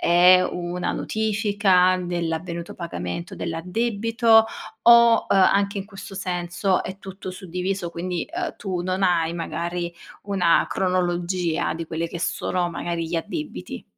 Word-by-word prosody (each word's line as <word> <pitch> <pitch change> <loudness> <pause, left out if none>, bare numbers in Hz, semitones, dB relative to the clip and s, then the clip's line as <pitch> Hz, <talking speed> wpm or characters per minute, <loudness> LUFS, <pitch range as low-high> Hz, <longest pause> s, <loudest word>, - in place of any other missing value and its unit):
è 180 +1 +7
una 175 0 -3
notifica 205 -4 +2
dell'avvenuto 170 0 -3
pagamento 170 - -5
dell'addebito 225 +6 +2 0.4
o, 235 0 +8 0.2
uhm, - - +4
anche 200 +1 +3
in 195 - -4
questo 195 -1 -10
senso 180 0 -1
è 190 - -6
tutto 190 0 -8
suddiviso, 185 0 -3
quindi, 175 +1 -3
ehm, 345 +1 -4
tu 185 -3 -3
non 185 +2 -2
hai 170 -2 +2
magari 170 +1 -3 0.3
una 190 -4 +3
cronologia 180 -2 0
di 165 - -5
quelli 165 +1 -3
che 170 - -7
sono 175 +1 -1
magari 170 -1 -3
gli 170 - -2
addebiti. 220 - -5
180 Hz, 130 wpm, -23 LUFS, 170-195 Hz, 0.4 s, o